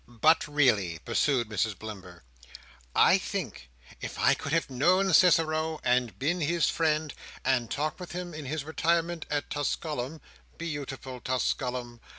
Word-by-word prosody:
"But 155 +9 +3
really," 120 - +2
pursued 120 0 +1
Mrs 110 -1 -1
Blimber, 95 -5 -9 0.7
"I 190 - +6
think 120 - -5 0.3
if - - -6
I - - +4
could 145 - -5
have 165 +1 +1
known 180 +9 +2
Cicero, 160 -2 +4
and 125 -2 +1
been 165 +6 0
his 170 +2 +2
friend, 155 -2 0 0.3
and 120 -3 +1
talked 150 +6 -2
with 180 - -8
him 175 -1 -5
in 155 -1 -7
his 145 +2 -3
retirement 165 +1 0
at 145 -1 -2
Tusculum 145 -1 -2 0.4
(beau 155 -4 -4
ti 135 - -6
ful 130 -1 -8
Tusculum!) 125 -2 -2
145 Hz, 150 wpm, -28 LUFS, 125-165 Hz, 0.7 s, I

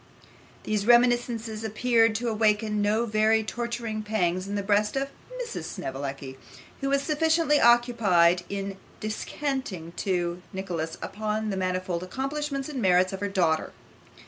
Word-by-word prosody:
These 210 0 -1
reminiscences 240 -2 +3
appeared 225 0 +2
to 240 +2 -2
awaken 215 -1 +1
no 215 +3 +2
very 220 0 +3
torturing 235 -1 -3
pangs 185 -4 -1
in 200 - -3
the 200 - -1
breast 210 +3 +2
of 275 0 -1 0.3
Mrs. 480 -2 -5
Snevellicci, 135 0 -6 0.4
who 275 - -1
was 280 0 +2
sufficiently 315 0 +2
occupied 215 -8 +4
in 195 -1 -4 0.2
descanting 215 - -4
to 175 -2 -1
Nicholas 175 -4 -4
upon 215 +1 -2
the - - -2
manifold 185 -2 -2
accomplishments 275 +7 -3
and 280 -5 -4
merits 185 -1 +3
of 190 - -4
her 205 0 -2
daughter. 170 -5 +1
215 Hz, 135 wpm, -27 LUFS, 185-240 Hz, 0.4 s, occupied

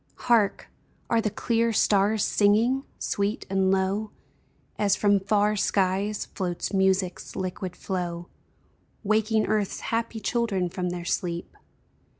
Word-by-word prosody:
Hark! 220 -5 +1 0.4
are 230 -1 +4
the 215 - 0
clear 230 +2 0
stars 210 0 +3
singing? 230 +6 +2
Sweet 200 +2 -2
and 190 -1 +2
low, 195 +3 0 0.7
As 200 -2 +3
from 205 0 +3
far 205 +2 +2
skies, 200 +1 0
floats 180 0 -3
music's 190 -1 0
liquid 185 -1 -4
flow, 175 -2 -4 0.8
Waking 215 +1 +2
earth's 210 -2 -1
happy 230 0 -1
children 205 -5 0
from 180 0 -3
their 175 -1 -5
sleep. 170 -1 -3
200 Hz, 120 wpm, -26 LUFS, 190-215 Hz, 0.8 s, are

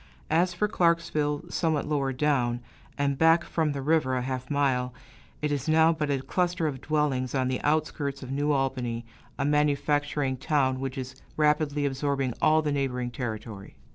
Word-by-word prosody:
As 175 +3 +3
for 175 +4 0
Clarksville, 165 -5 +1
somewhat 160 -4 0
lower 140 -3 0
down, 125 -3 +1 0.4
and 140 -1 0
back 165 +1 +5
from 160 -3 0
the 140 -1 -4
river 150 -3 +2
a 125 - -1
half 130 -1 -4
mile, 130 -3 +1 0.5
it 150 - +1
is 145 +1 -2
now 160 +1 +5
but 155 -2 -2
a 135 -2 0
cluster 175 0 0
of 135 -4 -2
dwellings 145 -4 0
on 130 -1 +1
the 130 - -2
outskirts 145 -2 -1
of 130 - -7
New 145 +2 0
Albany, 130 -4 -1 0.3
a 140 - 0
manufacturing 145 -1 +1
town 130 -2 +1
which 135 0 -4
is 130 0 -7 0.2
rapidly 150 -1 +2
absorbing 135 -2 -1
all 155 0 +4
the 150 - 0
neighboring 125 -3 -1
territory. 110 -4 -6
145 Hz, 170 wpm, -27 LUFS, 130-150 Hz, 0.5 s, back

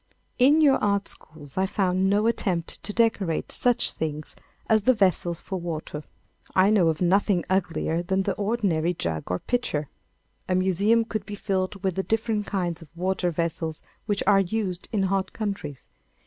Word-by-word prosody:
In 285 +5 +6
your 280 -3 +6
art 200 -1 +1
schools 150 -2 -10
I 190 - +2
found 190 -1 +1
no 205 +2 +2
attempt 190 -7 -1
to - - -4
decorate 210 -7 +1
such 245 -1 +1
things 155 -1 -4 0.3
as 220 -1 +4
the 255 +5 +4
vessels 180 -4 +1
for 190 -2 -4
water. 155 -3 -5 0.5
I 190 +2 +5
know 195 -6 +4
of 160 +1 0
nothing 185 0 +3
uglier 170 -3 0
than 190 +2 0
the - - 0
ordinary 195 -6 0
jug 80 - -3
or 90 - 0
pitcher. 155 - -2 0.6
A 185 - +2
museum 200 +5 +3
could 215 -3 -4
be 205 - -5
filled 195 -1 -2
with 190 -1 +1
the 190 - -1
different 220 0 -1
kinds 175 -4 -2
of 165 - -12
water 185 0 0
vessels 165 -1 -3 0.2
which 205 -2 0
are 200 0 +5
used 195 -1 -2
in 205 -3 +1
hot 190 0 0
countries. 195 - -5
190 Hz, 170 wpm, -25 LUFS, 170-210 Hz, 0.6 s, In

